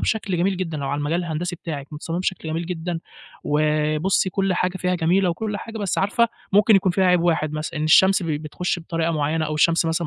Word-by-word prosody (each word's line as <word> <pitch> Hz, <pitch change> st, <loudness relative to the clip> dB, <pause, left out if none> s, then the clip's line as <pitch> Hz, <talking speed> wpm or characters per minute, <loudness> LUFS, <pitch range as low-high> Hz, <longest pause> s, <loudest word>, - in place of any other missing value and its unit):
بشكل 210 Hz, -4 st, -1 dB
جميل 185 Hz, +3 st, +1 dB
جدًا، 170 Hz, -4 st, -3 dB
لو 140 Hz, -, -3 dB
على 145 Hz, +1 st, -1 dB
المجال 150 Hz, +4 st, -1 dB
الهندسي 170 Hz, +2 st, -3 dB
بتاعِك، 150 Hz, -4 st, -7 dB
متصممة 165 Hz, +3 st, -4 dB
بشكل 185 Hz, -3 st, -3 dB
جميل 165 Hz, +2 st, -3 dB
جدًا، 170 Hz, -1 st, -4 dB, 0.4 s
وبُصّي 155 Hz, +5 st, +1 dB
كلّ 195 Hz, 0 st, 0 dB
حاجة 180 Hz, +1 st, -1 dB
فيها 180 Hz, 0 st, 0 dB
جميلة 180 Hz, +3 st, +2 dB
وكلّ 210 Hz, +4 st, -3 dB
حاجة، 225 Hz, +2 st, -7 dB
بس 200 Hz, -3 st, -1 dB
عارفة 215 Hz, +4 st, +2 dB, 0.2 s
ممكن 210 Hz, +1 st, +6 dB
يكون 190 Hz, -1 st, +2 dB
فيها 190 Hz, +1 st, +2 dB
عيب 180 Hz, -1 st, +4 dB
واحد 160 Hz, -3 st, +1 dB
مثلًا، 155 Hz, +1 st, -4 dB
إن 155 Hz, -, -1 dB
الشمس 190 Hz, +4 st, +5 dB
ب -, -, -4 dB
بتخش 155 Hz, +4 st, -2 dB
بطريقة 165 Hz, 0 st, -2 dB
معيّنة 155 Hz, +1 st, 0 dB
أو 155 Hz, -, -3 dB
الشمس 165 Hz, +2 st, +3 dB
مثلًا 165 Hz, +1 st, -1 dB
170 Hz, 215 wpm, -22 LUFS, 155-185 Hz, 0.4 s, ممكن